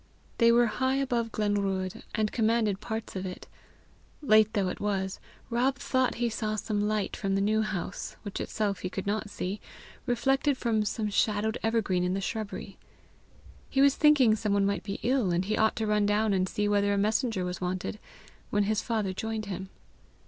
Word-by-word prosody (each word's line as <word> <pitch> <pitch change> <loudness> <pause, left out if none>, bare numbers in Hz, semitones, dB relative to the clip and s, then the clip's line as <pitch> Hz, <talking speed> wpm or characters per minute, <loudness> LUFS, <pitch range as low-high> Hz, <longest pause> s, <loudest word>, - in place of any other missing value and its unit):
They 230 -1 +6
were 240 +1 +5
high 260 +3 0
above 240 -4 0
Glenruadh, 200 -3 -1
and 215 -1 0
commanded 220 -3 +1
parts 220 -1 -5
of 190 - -3
it: 185 -1 -6 0.8
late 215 -4 +5
though 195 -4 +1
it - - -5
was, 190 -2 -2 0.3
Rob 255 +3 +2
thought 260 -1 0
he 240 0 0
saw 215 -1 -2
some 210 0 -1
light 215 -1 -1
from 195 -1 -1
the - - +2
New 215 +2 +2
House, 195 -4 -4
which 205 -2 -5
itself 205 -3 -1
he 185 - -3
could 190 +1 -5
not 210 +1 -1
see, 200 +1 -4 0.5
reflected 270 +3 +2
from 220 -4 +1
some 210 0 -2
shadowed 215 +1 +1
evergreen 215 -5 +1
in 180 +1 0
the - - -1
shrubbery. 215 +1 -5 0.9
He 270 - -1
was 280 0 +6
thinking 285 -7 +5
some 210 -2 -1
one 200 -1 +3
might 200 0 0
be 200 -1 -5
ill, 250 -5 +2
and 175 +2 +1
he 215 +2 0
ought 220 0 +2
to 220 - -1
run 210 -1 +2
down 210 0 +2
and 185 -1 +1
See 210 0 -1
whether 205 0 +2
a - - +1
messenger 215 -1 +1
was 180 +1 -4
wanted, 185 +3 -3 0.5
when 205 0 +2
his 215 +1 0
father 215 -5 -1
joined 220 +2 -3
him. 190 -1 -5
210 Hz, 190 wpm, -28 LUFS, 195-225 Hz, 0.9 s, They